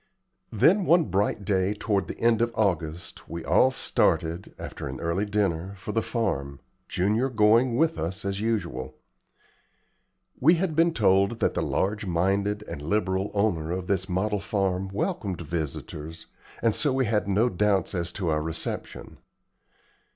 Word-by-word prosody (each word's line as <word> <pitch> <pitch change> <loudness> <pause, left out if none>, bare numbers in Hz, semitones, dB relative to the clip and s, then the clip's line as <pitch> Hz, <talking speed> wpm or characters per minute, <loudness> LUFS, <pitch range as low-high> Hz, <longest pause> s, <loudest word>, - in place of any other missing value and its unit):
Then, 180 - +4
one 170 0 +5
bright 100 +1 0
day 95 0 +1
toward 105 -1 -1
the - - -6
end 115 -1 +3
of 120 0 +1
August, 85 -5 -2
we 85 0 -6
all 130 - +5
started, 85 -8 0
after - - -6
an - - -6
early 85 +5 -1
dinner, 100 -3 -1
for 95 +3 -6
the 115 - +1
farm, 70 - -2 0.3
Junior 105 +8 +1
going 115 +2 +4
with 160 +4 +2
us 95 +5 -4
as 100 0 -2
usual. 85 - -2 1.4
We 160 +7 +6
had 170 -2 -1
been 165 +1 +3
told 100 +1 +3
that - - +1
the - - -1
large 105 +1 -1
minded 100 +4 0
and 70 - -6
liberal 95 +3 0
owner 90 -7 +1
of 90 0 -3
this 95 0 -1
model 100 +3 0
farm 95 -2 -1
welcomed 100 - -3
visitors, 80 0 -5 0.4
and 115 -2 +3
so 150 +3 +1
we 130 0 +1
had 105 -2 0
no 100 +5 +3
doubts 100 -3 +1
as 85 -2 -2
to 90 -5 -2
our 75 -1 +1
reception. 80 +1 -5
100 Hz, 155 wpm, -26 LUFS, 90-110 Hz, 1.4 s, We